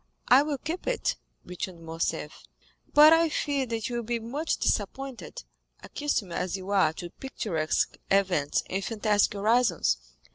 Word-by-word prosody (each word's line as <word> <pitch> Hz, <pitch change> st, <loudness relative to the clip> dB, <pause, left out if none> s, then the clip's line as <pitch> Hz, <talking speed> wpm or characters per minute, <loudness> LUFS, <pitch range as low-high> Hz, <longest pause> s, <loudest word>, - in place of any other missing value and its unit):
"I 255 Hz, +3 st, +8 dB
will 295 Hz, -1 st, -2 dB
keep 320 Hz, +7 st, -5 dB
it," -, -, 0 dB, 0.3 s
returned 180 Hz, -1 st, -6 dB
Morcerf; 165 Hz, +1 st, -3 dB, 0.5 s
"but 305 Hz, +2 st, +8 dB
I 330 Hz, 0 st, +4 dB
fear 280 Hz, -3 st, -1 dB
that 225 Hz, -2 st, -3 dB
you 240 Hz, -1 st, -3 dB
will 235 Hz, -, -3 dB
be 235 Hz, +1 st, -1 dB
much 270 Hz, +8 st, -2 dB
disappointed, 270 Hz, -, -3 dB, 0.4 s
accustomed 250 Hz, -11 st, -2 dB
as 180 Hz, +2 st, -2 dB
you 190 Hz, +1 st, -7 dB
are 190 Hz, -6 st, +4 dB
to 175 Hz, +1 st, -8 dB
picturesque 170 Hz, -12 st, -2 dB
events 185 Hz, -7 st, +2 dB
and 195 Hz, +1 st, -2 dB
fantastic 210 Hz, -1 st, +1 dB
horizons. 215 Hz, -2 st, +2 dB
225 Hz, 145 wpm, -27 LUFS, 185-275 Hz, 0.5 s, I